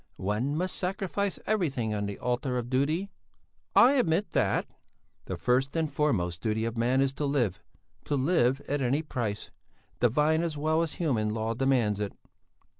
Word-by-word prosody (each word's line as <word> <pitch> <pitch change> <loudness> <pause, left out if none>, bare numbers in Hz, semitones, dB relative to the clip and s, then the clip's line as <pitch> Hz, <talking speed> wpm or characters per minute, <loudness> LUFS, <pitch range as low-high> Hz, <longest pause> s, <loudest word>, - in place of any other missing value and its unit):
"One 110 +9 -1
must 185 +3 -2
sacrifice 195 +1 -2
everything 140 - 0
on 105 -1 -2
the 100 - -5
altar 125 +1 -1
of 120 0 -4
duty." 155 +9 0 0.6
"I 250 - +8
admit 205 - +1
that." - - +1 0.6
"The - - -4
first 130 +4 +1
and 160 -3 -1
foremost 95 - 0
duty 110 +1 0
of 115 0 -3
man 125 +3 +2
is 135 0 +1
to 145 - -2
live 120 -10 0 0.4
to 145 - 0
live 135 -2 +2
at 145 0 -2
any 135 +5 +1
price! 115 -8 -4 0.5
Divine 150 +7 +3
as 165 -3 -2
well 155 +2 +1
as 165 -2 -2
human 120 -11 0
law 110 0 -1
demands 120 -5 +1
it." 105 -1 -3
135 Hz, 165 wpm, -28 LUFS, 115-160 Hz, 0.6 s, I